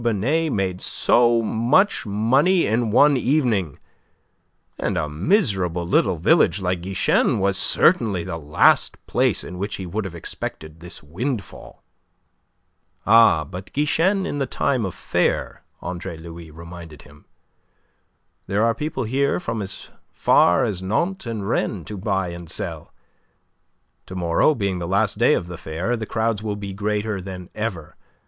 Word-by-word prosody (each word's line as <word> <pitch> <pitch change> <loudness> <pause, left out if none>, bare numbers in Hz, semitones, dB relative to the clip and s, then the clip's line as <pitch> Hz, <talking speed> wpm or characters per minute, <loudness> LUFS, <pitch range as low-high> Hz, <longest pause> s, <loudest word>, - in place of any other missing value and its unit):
Binet 125 +9 0
made 95 -4 -2
so 120 -1 +3
much 120 - +2
money 130 - +3
in 115 +2 0
one 145 +6 +5
evening 120 - +1 1.0
and - - -1
a 75 - -1
miserable 90 - 0
little 90 0 +2
village 85 +3 +3
like 90 -2 -1
Guichen 95 +2 +1
was 100 0 +1
certainly 100 - +2
the 85 -2 -5
last 75 0 +3
place - - +1
in 90 0 -8
which 100 +2 -3
he 95 - -6
would 100 +5 -3
have 90 -3 -6
expected 80 -1 -7
this 90 -1 -10
windfall. 100 - -6 1.2
"Ah, 110 -7 +6
but 90 +5 -9
Guichen 180 +7 +1
in 145 - -3
time 125 -4 0
of 90 - -7
fair," - - -1 0.2
Andre 90 -1 -5
Louis 85 0 -10
reminded 85 -1 -11
him. - - -18 1.2
"There 105 +3 +1
are 115 - +2
people 150 0 -3
here 135 +7 0
from 115 - -3
as 100 0 -4 0.2
far 90 +6 +4
as 100 -5 -2
Nantes 170 - -1
and 110 -4 -4
Rennes 100 -5 -1
to 105 - -6
buy 95 -2 -1
and 85 -1 -9
sell. - - -5 1.2
To 95 - -8
morrow, 85 - +2
being 100 -5 -2
the 85 - -4
last 100 +2 +1
day 120 +5 +5
of - - -2
the 90 0 -8
fair, 85 +12 -3
the 110 -2 -5
crowds 110 -2 -1
will 105 -2 -3
be 100 -1 -6
greater 105 0 -2
than 90 -1 -8
ever. 105 -8 -5
100 Hz, 150 wpm, -22 LUFS, 90-115 Hz, 1.2 s, Ah